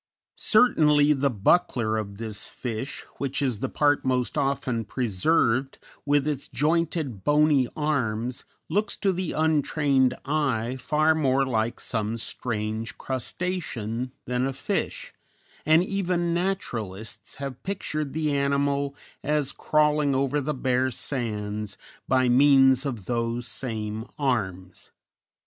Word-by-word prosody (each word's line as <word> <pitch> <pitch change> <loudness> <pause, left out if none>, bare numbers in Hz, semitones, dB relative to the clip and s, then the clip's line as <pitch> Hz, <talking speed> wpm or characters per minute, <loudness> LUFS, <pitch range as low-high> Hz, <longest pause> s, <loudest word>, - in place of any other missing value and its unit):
Certainly 150 -11 +4
the 140 0 +1
buckler 115 - +2
of 100 -2 -4
this 110 -2 -4
fish, 125 +2 -5
which 140 -1 -1
is 130 -7 0
the 135 - -2
part 145 -1 +2
most 125 -2 0
often 135 -5 0
preserved, 125 - +1 0.3
with 145 0 +3
its 145 -3 -2
jointed, 150 - 0
bony 145 -3 +4
arms, 125 -5 -1 0.2
looks 205 +1 0
to 195 -2 +1
the 180 -1 -2
untrained 145 -4 +2
eye 130 -5 0
far 155 +5 +2
more 135 -3 +2
like 115 -2 -1
some 110 -1 -2
strange 110 0 -3
crustacean 130 - -3
than 125 +1 0
a 135 - -3
fish, 135 - -3 0.5
and 160 +2 +6
even 180 -3 -1
naturalists 115 - -3
have 135 -2 -6
pictured 155 -7 -3
the 155 -2 0
animal 140 0 0 0.3
as 150 -1 +1
crawling 150 -2 +2
over 140 +2 +1
the 150 +1 -2
bare 130 0 +1
sands 105 -5 -3 0.3
by 130 -1 +3
means 135 +1 +5
of 115 -8 -5
those 120 0 -1
same 110 -3 -4
arms. 95 - -2
135 Hz, 120 wpm, -26 LUFS, 115-150 Hz, 0.5 s, and